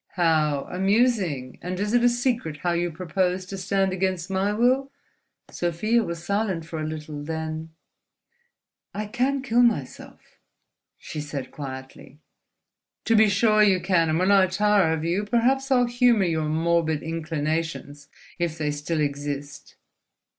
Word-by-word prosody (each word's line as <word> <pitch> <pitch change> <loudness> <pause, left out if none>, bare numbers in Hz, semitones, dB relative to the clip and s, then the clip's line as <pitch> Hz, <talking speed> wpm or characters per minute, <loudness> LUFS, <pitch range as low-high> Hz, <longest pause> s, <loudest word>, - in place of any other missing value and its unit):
"How 155 -5 +2
amusing! 190 - +1
And 180 +1 -4
is 210 +2 -1
it 240 0 +4
a 245 - +6
secret, 240 - -1
how 175 - +1
you 175 0 0
propose 180 +2 -1
to 195 - -7
stand 195 0 0
against 185 -1 -2
my 190 +2 +1
will?" 255 +5 +1 0.6
Sofia 215 +7 0
was 170 -3 -5
silent 200 -3 -1
for 165 -1 -6
a 155 - -3
little; 150 -1 -6
then, 160 0 -4 1.3
"I 210 +1 -3
can 260 +5 -1
kill 240 -2 +2
myself," 215 - -2 0.6
she 150 - -7
said, 145 -2 -6
quietly. 130 0 -9 0.9
"To 230 - +3
be 215 -1 +6
sure 215 +2 +3
you 195 -3 +4
can! 170 -3 +2
And 155 - +1
when 185 +3 +2
I 195 -2 +5
tire 200 -2 +2
of 160 0 -2
you, 175 +5 0
perhaps 250 +5 +1
I'll 250 -2 +4
humour 240 -4 +3
your 160 -3 -1
morbid 160 -1 +1
inclinations—if 160 0 -4
they 150 -2 -1
still 150 +2 -2
exist." 145 0 -4
180 Hz, 145 wpm, -24 LUFS, 155-210 Hz, 1.3 s, a